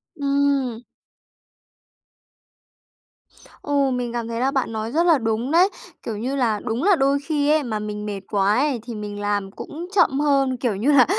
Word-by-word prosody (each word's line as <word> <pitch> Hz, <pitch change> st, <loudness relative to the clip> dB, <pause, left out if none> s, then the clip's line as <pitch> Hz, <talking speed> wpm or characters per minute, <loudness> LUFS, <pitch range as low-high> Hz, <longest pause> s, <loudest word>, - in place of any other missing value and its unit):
Ừm. 280 Hz, -5 st, 0 dB, 2.8 s
Ừ, 280 Hz, -2 st, +1 dB
mình 245 Hz, -2 st, -2 dB
cảm 235 Hz, -1 st, -3 dB
thấy 230 Hz, 0 st, -4 dB
là 265 Hz, +2 st, +1 dB
bạn 265 Hz, -4 st, -1 dB
nói 220 Hz, 0 st, -4 dB
rất 325 Hz, +5 st, +2 dB
là 335 Hz, -3 st, +5 dB
đúng 230 Hz, +2 st, -1 dB
đấy. 355 Hz, +4 st, +5 dB, 0.4 s
Kiểu 220 Hz, -3 st, -3 dB
như 255 Hz, +6 st, -2 dB
là, 230 Hz, -6 st, +1 dB
đúng 235 Hz, +3 st, -2 dB
là 400 Hz, +1 st, +5 dB
đôi 275 Hz, -2 st, +2 dB
khi 295 Hz, -3 st, 0 dB
ấy 310 Hz, -1 st, +3 dB
mà 220 Hz, -4 st, -3 dB
mình 210 Hz, 0 st, -5 dB
mệt 200 Hz, -2 st, -4 dB
quá 200 Hz, 0 st, +2 dB
ấy 275 Hz, -2 st, +1 dB
thì 235 Hz, -2 st, -7 dB
mình 205 Hz, -1 st, -6 dB
làm 205 Hz, -1 st, -1 dB
cũng 330 Hz, -, -8 dB
chậm 275 Hz, -8 st, +3 dB
hơn, 275 Hz, -3 st, +2 dB
kiểu 240 Hz, -4 st, -1 dB
như 230 Hz, +10 st, +1 dB
là 265 Hz, -4 st, +6 dB
250 Hz, 180 wpm, -22 LUFS, 220-285 Hz, 2.8 s, là